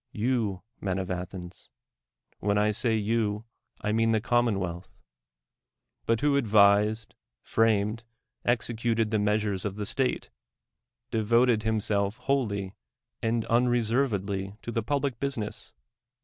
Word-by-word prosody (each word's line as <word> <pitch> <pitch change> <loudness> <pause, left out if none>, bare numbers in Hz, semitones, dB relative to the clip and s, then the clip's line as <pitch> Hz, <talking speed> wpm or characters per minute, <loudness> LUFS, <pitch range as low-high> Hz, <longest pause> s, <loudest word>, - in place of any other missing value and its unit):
You, 110 -5 -1 0.2
men 95 -2 -2
of 95 -1 -3
Athens. 90 0 -6 0.7
When 100 0 +1
I 105 +1 +3
say 115 +2 0
you, 110 0 0 0.4
I 105 - -1
mean 115 +1 +2
the 110 - +3
commonwealth. 100 -7 -1 1.1
But 115 -1 +2
who 140 -1 +3
ndvised, 105 0 +4 0.3
framed, 110 0 +1 0.4
executed 115 -2 0
the 110 - +2
measures 105 -2 0
of 105 0 -3
state, 130 -2 -1 0.8
devoted 115 +1 +3
himself 105 -1 0
wholly 100 -9 -1 0.5
and 115 0 0
unreservedly 115 -5 +1
to 120 - -4
tho 115 - 0
public 140 0 -1
business? 130 -7 -4
110 Hz, 110 wpm, -28 LUFS, 100-115 Hz, 1.1 s, ndvised